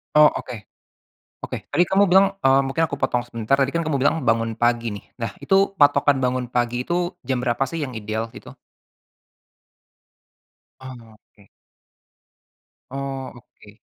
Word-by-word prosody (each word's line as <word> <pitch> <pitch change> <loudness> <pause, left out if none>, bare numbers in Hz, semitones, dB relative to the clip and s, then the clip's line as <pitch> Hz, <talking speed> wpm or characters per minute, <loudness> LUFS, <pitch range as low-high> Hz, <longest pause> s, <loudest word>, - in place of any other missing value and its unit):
Oh 150 0 +8
oke. 115 -4 -7 0.7
Oke, - - -6
tadi 175 - +3
kamu 195 +1 +3
bilang, 195 +1 +5
eee, 135 0 +5
mungkin 160 +5 0
aku 140 -3 -2
potong 125 -2 0
sebentar, 115 +1 -1
tadi 135 0 +1
kan 170 - -1
kamu 155 -3 -1
bilang 145 +4 +2
bangun 115 0 0
pagi 120 -1 +1
nih, 100 - -9
nah 115 -2 -4
itu 195 0 +2
patokan 145 -1 +4
bangun 125 -1 -1
pagi 120 0 -1
itu 175 +2 -2
jam 130 -2 -1
berapa 125 +1 0
sih 160 +5 -4
yang 130 -5 -4
ideal 110 +1 -3
itu? - - -11 2.3
Oh 120 -4 -11 0.2
oke. 100 - -21 1.4
Oh 135 -1 -5
oke. 110 -3 -18
130 Hz, 145 wpm, -22 LUFS, 115-145 Hz, 2.3 s, Oh